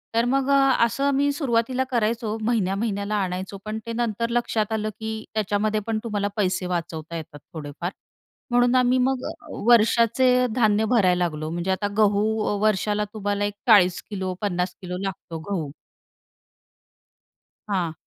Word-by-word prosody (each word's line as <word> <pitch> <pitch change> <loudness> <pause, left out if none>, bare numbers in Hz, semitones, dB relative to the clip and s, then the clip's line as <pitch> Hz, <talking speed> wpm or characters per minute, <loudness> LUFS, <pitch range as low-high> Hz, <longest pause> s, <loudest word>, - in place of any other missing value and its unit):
तर 230 +1 +3
मग 270 +2 +1
अ, 275 - +5 0.3
असं 255 +5 -2
आम्ही 280 +1 +2
सुरुवातीला 255 -3 0
करायचो. 225 -1 0
महिन्या-महिन्याला 205 -1 0
आणायचो, 185 +2 -4
पण 215 +1 -3
ते 230 - -4
नंतर 230 -1 -1
लक्षात 235 -2 0
आलं, 215 0 -1
की 220 0 -4
त्याच्यामध्ये 215 0 0
पण 220 -1 0
तुम्हाला 205 -3 -1
पैसे 185 -2 0
वाचवता 170 -2 -4
येतात 155 -2 -9
थोडेफार. 155 +3 -5 0.6
म्हणून 245 +1 +4
आम्ही 250 0 +4
मग 260 0 +1
अ, - - -8 0.4
वर्षाचे 240 +2 +4
धान्य 220 -2 +3
भरायला 185 -6 +3
लागलो. 155 -1 -4
म्हणजे 175 +3 -2
आता 190 +2 0
गहू 205 -1 +3 0.4
वर्षाला 210 0 +1
तुम्हाला 205 -1 -1
40-50 190 -3 +1
किलो 180 -1 -5
लागतो 170 -4 -5
गहू. 160 -7 -2 2.0
हां. 180 -5 0
210 Hz, 135 wpm, -24 LUFS, 185-235 Hz, 2.0 s, अ